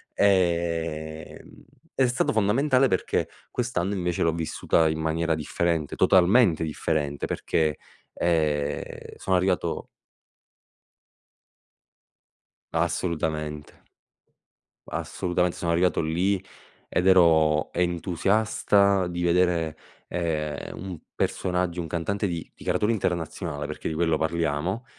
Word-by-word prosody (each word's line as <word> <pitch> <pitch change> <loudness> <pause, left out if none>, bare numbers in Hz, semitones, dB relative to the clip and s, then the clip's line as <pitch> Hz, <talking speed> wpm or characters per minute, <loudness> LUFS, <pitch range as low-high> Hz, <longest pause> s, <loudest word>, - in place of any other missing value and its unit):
Ehm, 85 -5 -1 0.3
è 130 -2 +3
stato 125 +4 +1
fondamentale, 130 +6 +3
perché 95 - 0 0.2
quest'anno 105 -6 -1
invece 90 -3 -2
l'ho 80 - +3
vissuta 80 0 +1
in 80 0 -2
maniera 80 +1 0
differente, 80 0 -1
totalmente 95 -2 +4
differente, 75 -2 -2
perché, 80 -3 0 0.4
ehm, 75 -4 -1
sono 95 - 0
arrivato 90 0 0 2.9
Assolutamente. 75 -3 -2 1.0
Assolutamente, 90 0 -1
sono 85 -1 -1
arrivato 90 +1 +2
lì, 90 +5 0 0.5
ed 90 - 0
ero 80 -4 +4
entusiasta 95 +2 +2
di 85 0 -3
vedere, 85 -3 +2 0.3
ehm, 75 -4 -3
un 90 -2 -6 0.2
personaggio, 90 -1 -1
un 85 - -4
cantante 100 +6 -1
di 85 -2 -4
di - - -14
caratura 105 +2 +1
internazionale, 85 -6 -2
perché - - -5
di 80 - -3
quello 80 -1 +1
parliamo, 85 - -1
85 Hz, 100 wpm, -26 LUFS, 80-95 Hz, 2.9 s, totalmente